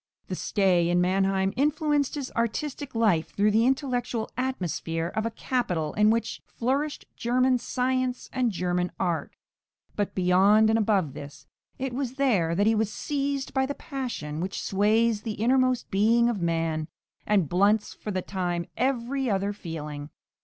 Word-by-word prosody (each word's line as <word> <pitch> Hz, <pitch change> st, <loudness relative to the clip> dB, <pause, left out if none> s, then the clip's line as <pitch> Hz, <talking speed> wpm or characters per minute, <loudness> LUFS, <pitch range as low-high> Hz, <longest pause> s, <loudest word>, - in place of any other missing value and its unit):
The -, -, -2 dB
stay 185 Hz, -5 st, +2 dB
in 175 Hz, 0 st, +3 dB
Mannheim 190 Hz, +1 st, +1 dB
influenced 295 Hz, 0 st, +1 dB
his 280 Hz, -3 st, -4 dB
artistic 260 Hz, +4 st, -3 dB
life 210 Hz, -8 st, +2 dB
through 210 Hz, +1 st, +3 dB
the 225 Hz, +3 st, +3 dB
intellectual 250 Hz, -4 st, -1 dB
atmosphere 175 Hz, -, -2 dB
of 220 Hz, +1 st, 0 dB
a -, -, -1 dB
capital 185 Hz, -, -2 dB
in 210 Hz, 0 st, +4 dB
which 225 Hz, 0 st, 0 dB
flourished 275 Hz, +5 st, -2 dB
German 250 Hz, +1 st, +2 dB
science 255 Hz, +1 st, -1 dB
and 255 Hz, -3 st, +1 dB
German 180 Hz, -1 st, -1 dB
art; 175 Hz, -4 st, -2 dB, 0.6 s
but 205 Hz, -1 st, -2 dB
beyond 195 Hz, +4 st, +4 dB
and 225 Hz, -, +3 dB
above 195 Hz, -9 st, +1 dB
this, 140 Hz, 0 st, -10 dB, 0.3 s
it 265 Hz, -1 st, -3 dB
was 255 Hz, -1 st, -2 dB
there 205 Hz, -12 st, +2 dB
that 200 Hz, +3 st, +2 dB
he 220 Hz, -, +4 dB
was 215 Hz, -1 st, 0 dB
seized 280 Hz, +1 st, -2 dB
by 265 Hz, -1 st, +1 dB
the 285 Hz, -, -4 dB
passion 240 Hz, -, -5 dB
which 185 Hz, +3 st, -3 dB
sways 215 Hz, +2 st, +2 dB
the 220 Hz, 0 st, -4 dB
innermost 255 Hz, +3 st, +1 dB
being 230 Hz, +4 st, +4 dB
of 215 Hz, -6 st, -2 dB
man, 165 Hz, -2 st, -1 dB, 0.4 s
and 200 Hz, -6 st, +3 dB
blunts 200 Hz, +6 st, +2 dB
for -, -, -8 dB
the 185 Hz, -3 st, -2 dB
time 175 Hz, -3 st, -2 dB
every 260 Hz, 0 st, 0 dB
other 200 Hz, 0 st, 0 dB
feeling. 150 Hz, -6 st, -6 dB
215 Hz, 155 wpm, -26 LUFS, 180-255 Hz, 0.6 s, in